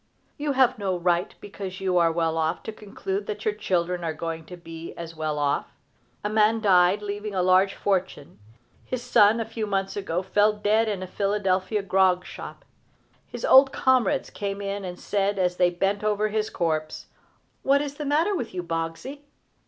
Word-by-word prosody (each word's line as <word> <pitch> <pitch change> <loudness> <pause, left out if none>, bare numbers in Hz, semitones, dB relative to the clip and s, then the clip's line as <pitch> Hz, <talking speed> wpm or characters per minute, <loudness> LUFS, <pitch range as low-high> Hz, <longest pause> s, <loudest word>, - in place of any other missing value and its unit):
You 290 -1 -2
have 255 -3 +3
no 190 -3 -1
right, 175 0 0
because 195 -2 -7
you 185 -2 +1
are 165 -1 +4
well 165 -1 0
off, 160 +1 -1
to - - -5
conclude 200 -1 -5
that 210 0 -5
your 215 - +2
children 180 -4 -1
are 160 -1 -2
going 165 0 -5
to 180 +2 -10
be 165 -1 -9
as 165 -1 -7
well 155 -1 -2
off. 145 -1 0 0.6
A - - 0
man 215 +1 +3
died, 190 -1 +4
leaving 205 0 -4
a 185 - +1
large 185 +2 +4
fortune. 190 - -2 0.4
His 250 -1 -4
son, 220 -2 +5
a 225 - -1
few 225 -1 -4
months 195 -1 -1
ago, 185 -3 -2
fell 210 +2 +3
dead 210 +2 +1
in 195 -3 -3
a - - -6
Philadelphia 195 0 0
grog 185 -1 +2
shop. - - -9 0.6
His - - -5
old 270 0 +7
comrades 255 -5 +1
came 200 -1 -4
in 200 0 -4
and 180 -1 -6
said, 200 0 0
as 180 -1 0
they 180 -1 +4
bent 195 +4 -1
over 215 0 +1
his 215 0 -1
corpse: 155 -3 -2 0.6
"What 275 +1 +3
is 285 -1 -3
the 300 - -4
matter 315 +8 +2
with 240 - -4
you, 180 - -3
Boggsey?" 165 - -4
195 Hz, 185 wpm, -25 LUFS, 175-210 Hz, 0.6 s, old